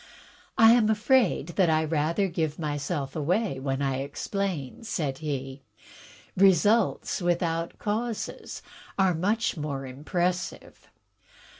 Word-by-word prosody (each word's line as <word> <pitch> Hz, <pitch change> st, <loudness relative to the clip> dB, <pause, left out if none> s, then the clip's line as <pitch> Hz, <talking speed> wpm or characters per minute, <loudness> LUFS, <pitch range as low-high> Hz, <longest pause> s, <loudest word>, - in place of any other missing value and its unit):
"I 225 Hz, 0 st, +8 dB
am 230 Hz, -2 st, +4 dB
afraid 220 Hz, -, +2 dB
that 185 Hz, -4 st, +4 dB
I 160 Hz, 0 st, +3 dB
rather 160 Hz, +5 st, 0 dB
give 160 Hz, -4 st, -2 dB
myself 145 Hz, -2 st, -3 dB
away 170 Hz, +1 st, 0 dB
when 135 Hz, 0 st, -2 dB
I 135 Hz, -1 st, 0 dB
explain," 160 Hz, -, -4 dB
said 150 Hz, -11 st, -2 dB
he. 135 Hz, -3 st, -4 dB, 0.7 s
"Results 195 Hz, +3 st, +3 dB
without 170 Hz, -1 st, -1 dB
causes 220 Hz, +2 st, -4 dB, 0.3 s
are 190 Hz, -2 st, +3 dB
much 205 Hz, +6 st, 0 dB
more 140 Hz, -3 st, -4 dB
impressive." 175 Hz, +7 st, -3 dB
170 Hz, 110 wpm, -27 LUFS, 145-200 Hz, 0.7 s, I